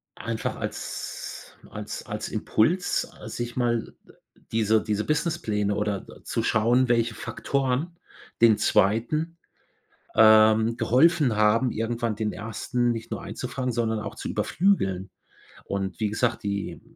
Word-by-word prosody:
einfach 115 -1 -3
als - - -6 0.2
als - - -6
als - - -5
Impuls, 175 +12 +1
ah, - - -12
sich 120 0 -5
mal 120 -2 0 0.6
diese 110 -1 +2
diese 105 -1 -1
Businesspläne 115 - 0
oder 105 -1 -1
d - - -15
zu - - -2
schauen, 120 +4 +3
welche 115 -2 +2
Faktoren 140 +9 -2 0.4
den 115 -2 +6
2., 120 - +1 0.8
ähm, 110 +1 +6
geholfen 130 +2 +3
haben, 110 +4 +3
irgendwann 115 0 -2
den 105 -1 -2
1. 120 +3 -1
nicht 115 -1 -5
nur - - -3
einzufangen, 130 -2 -4
sondern 110 -2 0
auch - - -6
zu - - -5
überflügeln. 95 - +1 0.6
Und 95 +1 -3
wie 110 - +1
gesagt, 115 +3 -1
die 100 -1 -3
115 Hz, 125 wpm, -26 LUFS, 105-125 Hz, 0.8 s, den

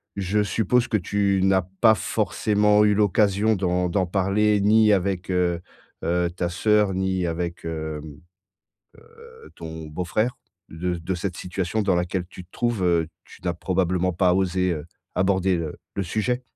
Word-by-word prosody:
je 100 +2 0
suppose 115 +4 +1
que 110 - +1
tu 100 0 0
n'as 95 -1 +4 0.2
pas 110 -2 +7
forcément 105 +2 +2
eu 105 -1 +3
l'occasion 105 +1 +2
d'en 90 -1 0
d'en 90 +1 0
parler 100 +3 +2
ni 105 +1 +5
avec, 95 -1 -1
heu, 90 -2 +1 0.4
heu, 90 0 +1
ta 85 -1 -2
sœur 105 +2 +2
ni 95 -1 -1
avec, 85 0 -4
hem, 80 -2 -5 1.0
heu, 465 -1 -15
ton 80 -1 -8
beau 75 +4 -4
frère, 110 +9 -1 0.3
de 90 +2 -3
de 85 +3 -4
cette 90 0 -4
situation 90 +3 -2
dans 100 -2 +2
laquelle 90 +1 -1
tu 90 - -11
te 85 - -34
trouves, 120 -5 -1
heu, 85 -3 +2 0.2
tu - - -16
n'as 90 - 0
probablement 90 0 0
pas 90 +1 +2
osé, 95 -1 +1
heu, 75 -2 -5 0.3
aborder 95 -1 +2
le 80 -2 -4 0.2
le 100 - -1
sujet? 110 +7 -1
95 Hz, 165 wpm, -24 LUFS, 90-105 Hz, 1.0 s, pas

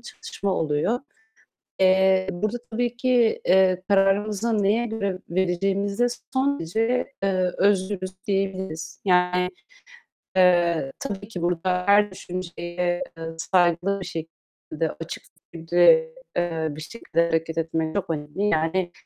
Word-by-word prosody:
çatışma 200 - -4
oluyor. 155 +10 0 0.8
Eee, 190 0 +4
burada 215 +6 -2
tabii 240 +1 -1
ki, 245 -2 +2
eee, 185 0 +4
kararımızı 205 +2 +2
neye 220 +4 +2
göre 200 -5 -3
vereceğimizde 195 +5 0 0.3
son 275 +2 +1
derece, 225 +10 -1
eee, 185 -2 +1
özgürüz 190 -1 +1 0.2
diyebiliriz. 190 -4 -3
Yani, 180 -1 +3 0.9
eee, 175 -6 +3
tabii 200 -6 -5
ki 180 -6 -6
burada 180 +1 0
her 205 +1 +5
düşünceye, 175 -1 -4 0.2
eee, 165 - -6
saygılı 180 +3 +2
bir 185 - -6
şekilde, 160 -1 -6
açık 165 - -6 0.3
bir 170 - -8
şekilde, 175 - +4 0.2
eee, 165 -2 0
bir 145 +1 -8
şekilde 170 -2 -1
hareket 165 0 -1
etmek 160 -1 -1
çok 200 -4 -2
önemli. 150 +5 -3
Yani 175 +1 0
185 Hz, 120 wpm, -24 LUFS, 170-205 Hz, 0.9 s, her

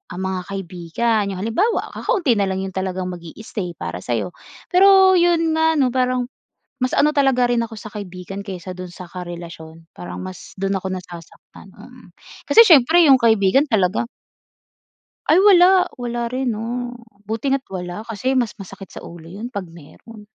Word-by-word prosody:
ah, - - -6
mga 190 -1 -2
kaibigan. 195 +4 -1
‘Yong - - -6
halimbawa, 370 - 0
kakaunti 325 - +1
na 200 - +1
lang 190 0 -2
‘yong 190 -1 -6
talagang 185 -1 -3
mag-i-stay 180 +1 -7
para - - -6
sa’yo. - - -3 0.4
Pero 380 0 +6
‘yon 340 -2 +2
nga 320 0 +2
'no, 265 -4 +2
parang 250 0 0 0.4
mas 255 -2 -2
ano 300 +1 +2
talaga 265 -3 +3
rin 240 -1 +1
ako 225 -1 -8
sa 215 - -9
kaibigan 195 -1 -8
kaysa 185 -2 -7
do’n 180 -1 -8
sa 180 +1 -10
karelasyon, 170 -2 -9
parang 90 0 -8
mas 95 0 -9
do’n 195 +1 0
ako 190 0 -3
nasasaktan, 175 -3 -11
mm. - - -15 0.4
Kasi 455 - +7
siyempre, 320 +1 +6
‘yong 270 - +8
kaibigan 225 +1 +3
talaga 195 -6 +1 1.3
ay 310 - +6
wala, 370 -2 +6 0.2
wala 240 -1 -3
rin 255 -2 -1
'no. 245 +2 -4 0.3
Buti 225 +5 -2
nga’t 275 -1 -1
wala, 180 +1 -6
kasi 230 +4 -2
mas 235 -4 -1
masakit 195 0 -11
sa - - -9
ulo 170 -1 -11
‘yon 210 +7 -7
‘pag 200 -4 -4
meron. 205 +7 -15
215 Hz, 165 wpm, -20 LUFS, 185-255 Hz, 1.3 s, yong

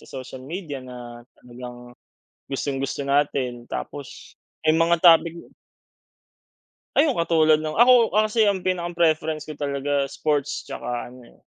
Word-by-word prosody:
sa - - -17
social 130 -1 -8
media 155 -2 -6
na 120 -1 -10 0.2
talagang, 125 0 -11 0.6
gustong-gusto 135 0 -3
natin. 140 -4 0
Tapos, 140 -4 -7 0.3
eh, 155 - +5
mga 170 +1 +3
topic 170 0 +4 1.4
ay 285 - +6
'yong 275 - 0
katulad 155 -2 +3
no'ng 155 0 -4
ako 240 0 +6
kasi 215 0 +3
ang 190 -2 -1
pinaka-preference 170 -4 0
ko 155 - -7
talaga 140 -1 -1
sports 145 -1 -2
'tsaka 120 0 -5
ano, 125 -2 -15
eh, - - -22
150 Hz, 130 wpm, -23 LUFS, 130-170 Hz, 1.4 s, ay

